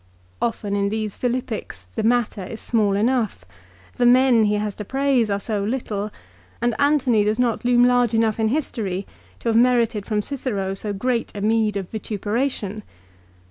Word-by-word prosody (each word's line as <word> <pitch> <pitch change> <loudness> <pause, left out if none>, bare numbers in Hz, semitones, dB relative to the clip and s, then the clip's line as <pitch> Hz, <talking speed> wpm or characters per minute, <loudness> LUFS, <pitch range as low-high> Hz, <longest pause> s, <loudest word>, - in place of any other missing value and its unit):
Often 210 -3 -1
in 200 0 +1
these 215 -1 -3
Philippics 240 - -3
the 90 0 -5
matter 230 -3 +1
is 220 +4 -7
small 210 -4 +1
enough. 230 +1 0 0.5
The 245 -1 +4
men 250 -2 +5
he 210 0 +2
has 210 0 -2
to - - -2
praise 265 -1 +1
are 200 0 0
so 205 0 -2
little; 210 -2 -2 0.5
and 240 0 +1
Antony 270 -7 +3
does 210 +1 0
not 245 -2 0
loom 245 0 +4
large 245 -2 +3
enough 225 -1 +1
in 220 - +2
history 215 -8 -2 0.4
to - - -1
have 225 - +1
merited 235 -3 +3
from 210 -2 0
Cicero 210 -9 -2
so 205 +2 -4
great 235 +4 -1
a 200 - -4
meed 215 -1 +2
of 190 -2 -4
vituperation 215 0 -2
220 Hz, 170 wpm, -22 LUFS, 205-245 Hz, 0.5 s, men